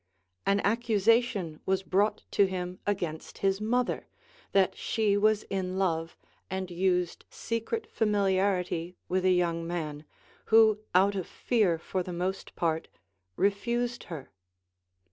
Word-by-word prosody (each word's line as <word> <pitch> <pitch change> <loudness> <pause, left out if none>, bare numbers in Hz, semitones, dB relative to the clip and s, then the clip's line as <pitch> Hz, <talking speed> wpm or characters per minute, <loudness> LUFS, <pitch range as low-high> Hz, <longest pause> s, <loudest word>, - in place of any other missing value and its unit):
An 200 0 +3
accusation 220 -5 +2
was 190 0 +1
brought 205 +3 +1
to 200 - +4
him 180 -1 -4
against 175 -6 -3
his 195 +1 +2
mother, 245 +3 0 0.4
that 195 -2 +3
she 215 -3 +1
was 215 +1 +3
in 185 -1 -3
love 165 -4 -1 0.3
and 190 -1 -3
used 180 0 0
secret 230 - -3
familiarity 190 -4 0 0.2
Avith 185 0 +1
a 185 - +5
young 170 -2 +1
man, 155 -3 -4 0.4
who 220 -1 +5 0.2
out 195 +2 +5
of 190 -3 -3
fear 210 -9 +1
for 185 +3 -3
the 180 - -5
most 185 +2 -3
])art 160 -1 0 0.5
re 200 - +4
fused 240 +4 -2
her. 155 -6 -8
190 Hz, 130 wpm, -29 LUFS, 180-210 Hz, 0.5 s, a